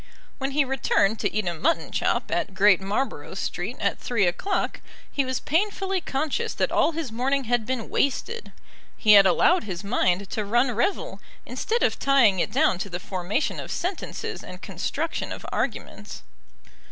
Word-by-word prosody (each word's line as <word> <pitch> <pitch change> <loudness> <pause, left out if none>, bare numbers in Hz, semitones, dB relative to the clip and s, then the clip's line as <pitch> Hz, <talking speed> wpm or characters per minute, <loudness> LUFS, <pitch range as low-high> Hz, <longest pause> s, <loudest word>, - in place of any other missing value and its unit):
When 270 0 -2
he 290 0 +3
returned 225 -5 +1
to - - 0
eat 215 -3 -1
a 175 - 0
mutton 290 - 0
chop - - 0
at 195 - -1
Great 195 -1 +5
Marlborough 210 +8 -3
Street - - -4
at - - 0
three 230 -6 +1
o'clock 185 - -1 0.3
he 280 - +1
was 260 0 -2
painfully 385 +2 0
conscious 290 0 -2
that - - 0
all 335 - +3
his 310 -6 -4
morning 270 +4 0
had 240 -2 0
been 255 -3 -2
wasted. 455 - -1 0.5
He 215 -2 +6
had 200 -1 +8
allowed 345 - +3
his 185 -2 -5
mind 200 -3 +1
to 215 - -1
run 240 +5 +2
revel, 395 - -1 0.2
instead 465 +2 -1
of - - +1
tying 250 -9 +4
it - - 0
down 180 - +2
to 200 - -4
the 175 0 -4
formation 190 - -2
of - - -6
sentences 360 +1 -4
and - - -9
construction - - -3
of - - -7
arguments. - - -4
245 Hz, 170 wpm, -25 LUFS, 200-295 Hz, 0.5 s, had